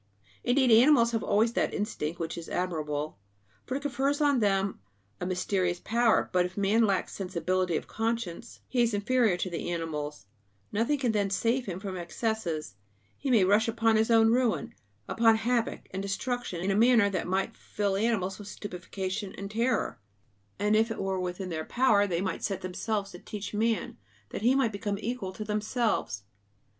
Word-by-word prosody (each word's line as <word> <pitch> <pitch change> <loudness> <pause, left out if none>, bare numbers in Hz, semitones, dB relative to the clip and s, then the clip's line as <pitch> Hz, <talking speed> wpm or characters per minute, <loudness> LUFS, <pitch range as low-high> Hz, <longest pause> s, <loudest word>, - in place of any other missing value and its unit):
Indeed, 255 0 +3
animals 235 +1 +6
have 225 -1 0
always 225 +3 +2
that - - 0
instinct 175 -6 -3
which 165 -1 -3
is 170 -1 -7
admirable, 155 - -2 0.5
for 260 - -2
it 280 - -8
confers 280 +1 0
on 285 -3 +3
them 195 -2 +1 0.4
a 180 - -3
mysterious 180 -1 0
power; 235 +2 +2
but 180 -1 +4
if 180 +2 -5
man 205 +3 +3
lacks 195 -3 0
sensibility 185 -2 -1
of - - -5
conscience 225 -2 -3
he 250 - +1
is 230 -3 +2
inferior 220 -2 +2
to 180 - -2
the 175 -1 -4
animals; 150 -7 -4 0.5
nothing 230 +8 +1
can 255 -4 +1
then 205 -2 +1
save 230 +5 0
him 185 -1 -4
from 190 -2 -5
excesses; 175 - -3 0.4
he 280 - -4
may 230 -6 +5
rush 205 +4 +4
upon 225 0 +2
his 220 +1 +2
own 225 -1 +5
ruin, 245 -2 +1 0.3
upon 225 -1 +4
havoc 235 +1 0
and 190 - -3
destruction 200 -1 -3
in 190 +2 0
a - - +1
manner 230 -1 +5
that 190 -3 -2
might 190 +5 -1
fill 200 -2 -2
animals 195 -3 0
with 205 - -9
stupefaction 190 0 -5
and 200 +1 -6
terror; 235 +2 0 0.6
and 210 +2 +2
if 220 +2 +3
it 225 - -4
were 190 -2 -1
in 185 +1 -6
their 160 -2 -3
power 215 -1 +3
they 175 -2 -1
might 190 -1 -3
set 195 -2 -2
themselves 200 +2 -3
to 175 - -10
teach 210 +2 -7
man, 220 - 0 0.3
that - - -4
he 245 +4 +4
might 265 -5 +2
become 200 0 -3
equal 230 -4 -3
to 215 +3 -6
themselves. 210 - -1
205 Hz, 180 wpm, -29 LUFS, 185-230 Hz, 0.6 s, animals